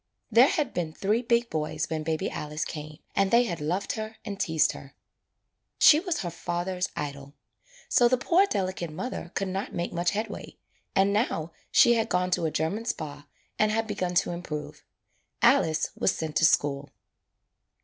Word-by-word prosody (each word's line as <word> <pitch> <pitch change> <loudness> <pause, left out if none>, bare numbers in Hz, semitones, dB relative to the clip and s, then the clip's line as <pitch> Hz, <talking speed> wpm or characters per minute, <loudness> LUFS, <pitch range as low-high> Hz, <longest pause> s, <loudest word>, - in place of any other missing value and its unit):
There 235 +4 +7
had 290 -5 -1
been 165 -3 -2
three 210 +7 0
big 235 -1 +1
boys 155 0 -2
when 160 -1 -3
baby 160 0 -1
Alice 150 +1 -4
came 150 -1 -7 0.2
and 195 -1 +3
they 235 +3 +5
had 170 -10 -4
loved 175 +6 -1
her 220 0 -5
and 200 -3 -5
teased 160 -2 +2
her. 135 +1 -12 0.8
She 305 - +7
was 355 -1 -2
her 175 -2 -4
father's 175 +2 -3
idol. 140 -1 -6 0.5
So 240 - +5
the 255 +1 +3
poor 360 +10 +3
delicate 185 - -2
mother 175 +1 -5
could 195 -1 -1
not 195 +2 -4
make 170 +1 -3
much 175 0 +1
headway, 215 +2 -5 0.4
and 195 +1 +3
now 175 -7 0 0.2
she 240 - +6
had 225 -2 0
gone 180 0 +1
to 170 - +1
a - - +1
German 160 +9 -2
Spa 145 -8 -5 0.3
and 215 0 +3
had 225 +1 0
begun 185 -4 -3
to 195 +1 +2
improve. 160 -4 -6 0.6
Alice 160 -1 +3
was - - +2
sent 160 -2 -4
to 160 - +5
school. 145 -3 +2
180 Hz, 175 wpm, -27 LUFS, 155-220 Hz, 0.8 s, There